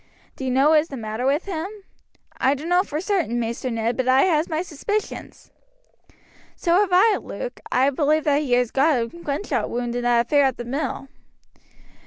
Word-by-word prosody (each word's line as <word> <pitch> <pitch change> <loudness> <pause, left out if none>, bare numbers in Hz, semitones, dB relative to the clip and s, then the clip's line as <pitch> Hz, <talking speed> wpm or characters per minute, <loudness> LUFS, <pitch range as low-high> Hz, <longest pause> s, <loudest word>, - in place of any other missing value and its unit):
"Do - - -8
you - - -1
know 270 +4 +3
what 315 - +6
is 310 - -2
the 275 - -7
matter 220 +2 -3
with 290 +5 +1
him?" 355 -3 -3 0.7
"I 270 +2 +3
dunno 345 +6 +1
for 305 -5 -4
certain, 350 - -1
Maister 235 +2 -3
Ned, 230 0 -1
but 260 -1 -2
I 260 +1 +5
has 320 -3 +1
my 320 +1 -1
suspicions." 410 +6 -5 1.0
"So 340 - 0
have 410 -2 +2
I, 405 +4 +5
Luke. - - -7
I 265 +2 +3
believe 305 +2 +1
he 280 -4 +2
got 275 0 +3
a 230 - 0
gunshot 290 - -3
wound 240 0 -3
in 245 - -1
that 240 -1 +2
affair 285 +2 +3
at 265 -2 0
the 240 - -6
mill." 270 +1 -3
280 Hz, 185 wpm, -23 LUFS, 245-325 Hz, 1.0 s, what